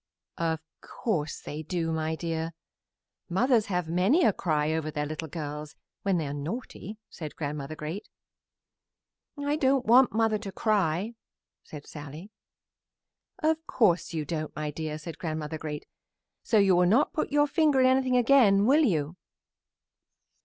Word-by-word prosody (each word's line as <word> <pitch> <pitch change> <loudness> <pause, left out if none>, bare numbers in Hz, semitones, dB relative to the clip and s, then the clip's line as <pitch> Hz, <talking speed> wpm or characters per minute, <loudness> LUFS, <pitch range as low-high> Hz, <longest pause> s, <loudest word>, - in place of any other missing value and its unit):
"Of 160 -1 0 0.2
course 160 -10 -3
they 150 +1 -6
do, 165 0 -2
my 160 0 -1
dear. 165 0 -3 0.8
Mothers 230 +4 +2
have 180 -4 -1
many 190 - +3
a 210 - +4
cry 155 -4 0
over 160 -1 -2
their 150 -1 -2
little 155 +2 -5
girls 150 -1 -6 0.3
when 195 -2 +1
they 160 - -1
are 140 - -4
naughty," 205 - -6
said 155 -3 -8
Grandmother 145 0 -4
Great. 160 +7 -6 1.3
"I 285 +1 -1
don't 265 -3 +2
want 250 +3 +6
mother 220 -1 +1
to 200 -2 -6
cry," 200 0 0 0.5
said 150 -2 -10
Sallie. 150 +7 -9 1.1
"Of 320 +1 +1
course 180 -8 +2
you 160 -3 -3
don't, 155 0 -4
my 150 -1 -3
dear," 155 0 -4
said 160 +2 -8
Grandmother 155 -3 -4
Great. 150 -1 -5 0.6
"So 220 - +1
you 195 -3 +5
will 180 0 +4
not 235 +10 +3
put 310 - -2
your 290 0 +4
finger 295 -2 +2
in 260 - +5
anything 260 -1 +3
again, 235 -6 +5
will 285 +6 +5
you?" 165 - 0
175 Hz, 150 wpm, -28 LUFS, 155-230 Hz, 1.3 s, want